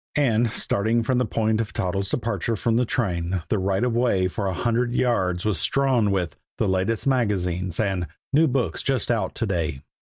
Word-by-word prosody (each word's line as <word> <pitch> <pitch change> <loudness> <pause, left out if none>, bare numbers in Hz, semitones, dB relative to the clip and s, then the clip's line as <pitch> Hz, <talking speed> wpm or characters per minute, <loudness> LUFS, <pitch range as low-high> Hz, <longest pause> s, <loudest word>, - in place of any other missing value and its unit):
And, 120 -5 +3
starting 110 +4 +1
from 125 +2 +1
the 125 - +1
point 110 0 +1
of 110 - -5
Toddles' 95 +1 -1
departure 115 -2 -1
from 115 +2 0
the 125 +2 +3
train, 90 -7 -1
the 105 - +1
right 95 +3 0
of 125 -2 +1
way 115 -7 +2
for 100 +2 -3
a 95 - -1
hundred 120 +4 0
yards 95 -9 +1
was 105 -7 0
strewn 130 -6 +2
with 90 -5 -1 0.2
"the 110 - +1
latest 95 +4 0
magazines" 95 -9 0
and 95 -5 0 0.3
"new 160 +3 +5
books 130 -3 -1
just 135 -3 0
out 105 -6 -1
to 115 - -1
day." 85 -8 -2
110 Hz, 190 wpm, -24 LUFS, 95-120 Hz, 0.3 s, new